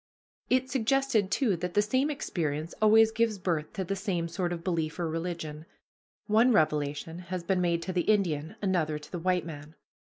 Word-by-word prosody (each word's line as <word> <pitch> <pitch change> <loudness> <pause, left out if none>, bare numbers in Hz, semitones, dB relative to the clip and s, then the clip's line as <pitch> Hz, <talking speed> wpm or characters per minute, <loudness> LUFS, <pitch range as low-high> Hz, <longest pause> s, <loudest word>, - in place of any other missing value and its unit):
It 255 0 +2
suggested, 260 -4 +1
too, 215 -1 +2
that 180 +1 -4
the 205 - +5
same 255 +7 +1
experience 160 - -3
always 220 +1 +6
gives 225 -1 +1
birth 165 -5 -2
to 190 - -2
the 195 +2 -2
same 190 -4 -2
sort 175 +1 -2
of 170 -1 -4
belief 165 -4 -1
or 175 -2 -1
religion. 165 -1 -4 0.6
One 225 +4 +4
revelation 150 -2 0
has 180 0 -5
been 185 +1 +1
made 170 -1 +1
to 185 - -4
the 180 - +2
Indian, 170 -5 +1
another 165 -6 +1
to 150 0 -13
the 175 - -4
white 180 0 +1
man. 155 -1 -9
180 Hz, 185 wpm, -29 LUFS, 165-210 Hz, 0.6 s, always